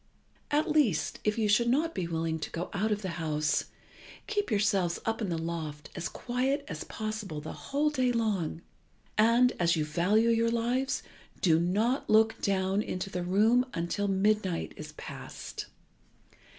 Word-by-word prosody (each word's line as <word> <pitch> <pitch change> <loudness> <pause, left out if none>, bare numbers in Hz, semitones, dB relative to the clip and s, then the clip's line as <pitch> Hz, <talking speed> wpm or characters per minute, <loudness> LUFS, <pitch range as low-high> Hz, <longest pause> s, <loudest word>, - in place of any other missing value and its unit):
At 300 +2 +2
least, 275 - +2
if 210 +1 +1
you 220 -2 +2
should 235 +3 +4
not 315 +6 +2
be 175 - -2
willing 165 -1 -1
to 150 - -4
go 170 +2 -5
out 210 +2 0
of 210 0 -1
the 175 -3 -4
house, 150 -2 +1 0.6
keep 415 -1 -1
yourselves 200 -5 +1
up 225 +1 -1
in 205 - -1
the 170 - -1
loft 160 -3 -5
as 170 - -3
quiet 265 +4 -1
as 155 -3 -5
possible 215 -7 -4
the 155 - -7
whole 295 +2 0
day 255 -4 +2
long, 200 -8 -1 0.5
and, 235 +3 +5
as 170 -1 +3
you 155 -2 0
value 190 +9 +2
your 230 0 +3
lives, 245 +4 0 0.4
do 165 -3 +4
not 215 +10 +1
look 220 +1 +4
down 195 0 +1
into 190 -1 -4
the 180 - -2
room 215 +7 +4
until 170 +4 -1
midnight 195 -2 +1
is 155 0 -9
past. - - -8
205 Hz, 165 wpm, -30 LUFS, 170-235 Hz, 0.6 s, and